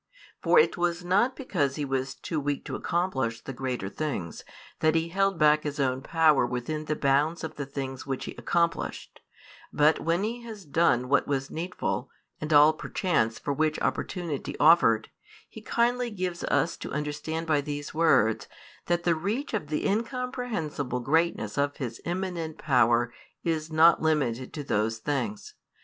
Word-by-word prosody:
For - - +4
it 460 - +4
was 175 0 -1
not 205 +9 +2
because 145 - -1
He 145 - -2
was 135 0 -2
too 160 - -3
weak 145 0 -2
to - - -4
accomplish 135 -10 -1
the 135 - -6
greater 125 -5 -3
things, 100 - -4 0.4
that 155 0 +3
He 165 +1 +1
held 195 +1 +1
back 150 -1 +5
His 150 0 -4
own 130 -1 +1
power 155 -1 +3
within 125 +6 -3
the 155 - -1
bounds 145 +5 +1
of 160 - -4
the 145 -2 -5
things 135 -2 -5
which 135 -2 -4
He - - -5
accomplished; 170 -1 -2 0.5
but 150 +1 +3
when 170 +3 0
He 235 +3 -3
has 220 -5 -9
done 140 -5 +2
what 140 +1 +2
was 135 -1 -2
needful, 175 +3 -3 0.3
and 155 +1 -4
all 150 +1 +7
perchance 155 - 0
for 145 - -2
which 155 +1 0
opportunity 170 -7 -3
offered, 130 -9 +5 0.4
He 220 - -11
kindly 240 +2 +1
gives 185 -4 -4
us 165 - +1
to - - -7
understand 150 +3 -3
by 155 -3 +2
these 145 0 -5
words, 155 -9 +3 0.4
that 175 0 +1
the 170 - +3
reach 205 - -3
of 205 -9 -2
the 150 +1 -1
incomprehensible 215 - -2
greatness 150 -5 0
of 145 0 0
His 120 -4 -5
immanent 175 -3 -3
power 120 -4 +3 0.3
is 160 -1 -1
not 160 +2 +6
limited 135 -6 0
to 150 - -5
those 110 -2 0
things. 205 - -3
155 Hz, 165 wpm, -27 LUFS, 135-175 Hz, 0.5 s, all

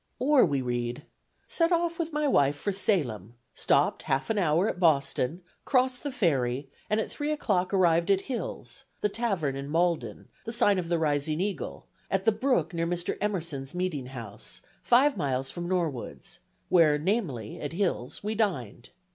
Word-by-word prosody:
Or 270 +2 +5
we 140 -3 -1
read: 120 +2 -3 0.4
"Set 335 +1 +1
off 340 -1 +1
with 330 -1 -2
my 300 0 0
wife 140 - +3
for 200 +8 -2
Salem; 125 - 0 0.2
stopped - - +2
half 135 +10 -1
an 215 - +1
hour 170 +2 +2
at 180 - -3
Boston, 155 0 +2 0.2
crossed 255 -1 +1
the 285 - -3
ferry, 135 - 0 0.2
and 215 - +2
at 220 - -1
three 295 +1 -2
o'clock 190 -11 0
arrived 170 -2 +3
at 195 -1 +4
Hill's, 385 - -5 0.2
the 210 - +2
tavern 195 - -1
in 140 +1 -5
Malden, 170 +1 0 0.2
the 230 - -5
sign 210 -5 +3
of 170 -2 -4
the 170 - +2
Rising 150 0 0
Eagle, 195 0 -3 0.2
at 195 0 0
the 225 - +6
brook 250 -1 0
near 165 0 -1
Mr. 175 0 -2
Emerson's 165 -9 -3
meeting 175 -8 -2
house, 115 -6 -7 0.2
five 260 +1 +4
miles 135 -4 -1
from 175 -1 -5
Norwood's: 155 - -3 0.3
where, 160 -4 +5
namely, 150 - -2
at 145 +1 -4
Hill's, 175 -8 -2
we 210 +1 -1
dined. 135 - -2
175 Hz, 170 wpm, -28 LUFS, 140-215 Hz, 0.4 s, the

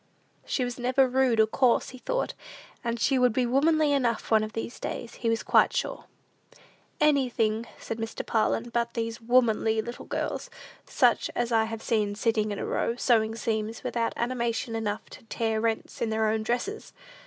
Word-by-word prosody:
She 260 - 0
was 245 0 -5
never 255 +2 +3
rude 255 -2 +2
or 220 - +7
coarse, 245 +2 +2
he 255 - -11
thought; - - -2 0.5
and 235 -1 -2
she 265 +4 +2
would 250 -2 +4
be 250 +2 +1
womanly 295 +4 +3
enough 240 -6 0
one 220 -1 +5
of 215 0 -5
these 225 +1 -5
days, 235 - -5
he 230 - -2
was 225 0 0
quite - - +4
sure. - - -3 0.9
"Anything," 240 -6 +2
said 225 - -5
Mr. 225 0 -4
Parlin, 225 +1 0
"but 235 0 -1
these 230 0 -3
womanly 225 -2 +3
little 240 +2 -5
girls, - - -3 0.4
such - - +2
as 240 0 -1
I 225 -1 +3
have 225 0 -6
seen 210 -3 0
sitting 215 0 +1
in 205 - -3
a - - -3
row, 230 - -1
sewing 225 -3 +2
seams, 220 0 -2
without 230 -1 -1
animation 235 -1 -1
enough 215 -2 -3
to - - -12
tear 225 -1 -1
rents 225 -1 -2
in 230 - +1
their 220 0 +1
own 220 0 0
dresses! 245 - -3
230 Hz, 180 wpm, -27 LUFS, 220-250 Hz, 0.9 s, or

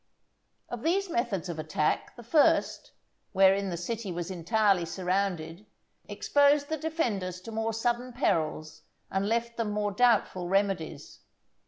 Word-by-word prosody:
Of 240 -2 -6
these 370 +4 0
methods 230 - -1
of 170 -2 -5
attack, 155 0 -1
the 240 - -11
first, 290 +6 +2 0.4
wherein 195 +1 +4
the 175 - -3
city 210 +3 -4
was 175 +1 -4
entirely 195 +1 +2
surrounded, 180 +1 -2 0.4
exposed 285 0 +3
the 315 - -1
defenders 235 - -2
to 225 - -9
more 225 0 -1
sudden 240 +2 -1
perils 155 - -1 0.3
and 195 +2 0
left 235 +1 -1
them 230 -2 -1
more 210 0 -1
doubtful 205 -5 +2
remedies. 190 -6 -1
205 Hz, 135 wpm, -28 LUFS, 180-235 Hz, 0.4 s, wherein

